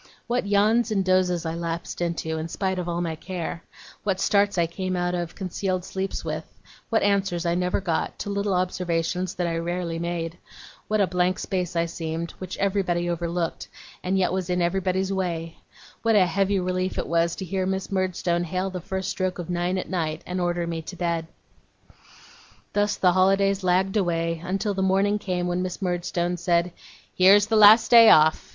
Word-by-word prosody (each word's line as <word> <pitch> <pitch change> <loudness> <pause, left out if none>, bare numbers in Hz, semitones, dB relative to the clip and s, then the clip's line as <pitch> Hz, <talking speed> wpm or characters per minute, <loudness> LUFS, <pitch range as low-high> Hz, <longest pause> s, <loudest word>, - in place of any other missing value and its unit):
What 240 -3 -1
yawns 215 +4 +3
and 195 -3 0
dozes 185 -2 +2
I 160 - -2
lapsed 170 +1 -4
into, 160 -2 -2
in 160 - -4
spite 190 +2 -2
of 175 -1 -3
all 170 0 -1
my 165 -2 -2
care; 170 0 -5 0.4
what 195 -2 0
starts 200 -1 +2
I 170 - +3
came 185 +2 -3
out 175 0 -1
of 175 -1 -3
concealed 185 -1 -3
sleeps 190 0 -4
with; - - -3 0.5
what 225 - +2
answers 195 -4 +1
I 170 - +1
never 180 +1 0
got, 175 -4 -2
to 205 - -4
little 200 -1 0
observations 180 0 -1
that 180 - -1
I 165 -1 -1
rarely 170 0 -3
made; 170 0 -4 0.5
what 215 -1 +1
a - - +5
blank 180 0 0
space 180 -3 -3
I 170 0 +2
seemed, 165 0 -4
which 185 -1 -6
everybody 190 -3 0
overlooked, 170 0 -2 0.4
and 185 +1 0
yet 185 -1 +1
was 185 -1 -2
in 180 0 +1
everybody's 190 +2 0
way; 170 -3 -3 0.4
what 225 -1 +2
a 195 -3 +6
heavy 195 +3 +1
relief 185 0 -2
it - - -1
was 170 0 +1
to 190 - -6
hear 185 +1 -2
Miss 190 0 -3
Murdstone 180 -2 0
hail 185 +3 -2
the 180 -1 -5
first 190 +2 -4
stroke 185 -1 -2
of 175 -1 -5
nine 175 +1 0
at 185 - -3
night, 160 -4 -2
and 180 0 -3
order 175 -1 0
me 165 -1 -3
to 180 - -9
bed! 170 -2 -2 1.5
Thus 205 0 +1
the 180 - +3
holidays 195 +1 +3
lagged 185 +3 +2
away, 165 -3 0
until 195 +3 -1
the 195 - -2
morning 195 +2 +2
came 180 -3 -2
when 180 0 -1
Miss 185 -1 -4
Murdstone 175 -1 -1
said: 175 0 +1 0.4
'Here's 195 +3 +6
the 220 +1 0
last 215 +1 +7
day 230 -1 +9
off! 155 +1 +5
180 Hz, 190 wpm, -25 LUFS, 170-195 Hz, 1.5 s, day